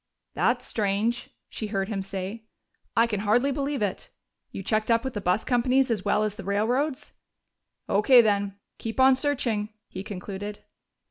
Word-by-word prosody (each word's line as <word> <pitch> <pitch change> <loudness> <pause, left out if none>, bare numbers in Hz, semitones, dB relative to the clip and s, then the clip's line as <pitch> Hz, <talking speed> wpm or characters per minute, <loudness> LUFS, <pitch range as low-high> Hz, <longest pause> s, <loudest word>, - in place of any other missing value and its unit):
"That's - - +1
strange," 215 +3 -1 0.2
she 215 - -5
heard 195 -2 -1
him 200 -3 -2
say. 195 +3 -6 0.5
"I 230 - +6
can 215 -4 -2
hardly 235 +7 +2
believe 280 -2 -1
it.... 200 - -3 0.4
You 195 - -6
checked 215 +3 0
up 230 0 +3
with 265 -1 -3
the 205 - -3
bus 180 +4 +1
companies 255 +1 +2
as 210 -5 0
well 210 +1 +2
as 215 -1 -1
the 205 -1 -9
railroads?... 245 - 0 0.7
O.K., 210 +6 +6
then. 200 -2 0 0.2
Keep 225 +2 -5
on 260 0 +7
searching," 245 -6 0 0.2
he 190 - -7
concluded. 205 0 -6
215 Hz, 160 wpm, -26 LUFS, 200-245 Hz, 0.7 s, on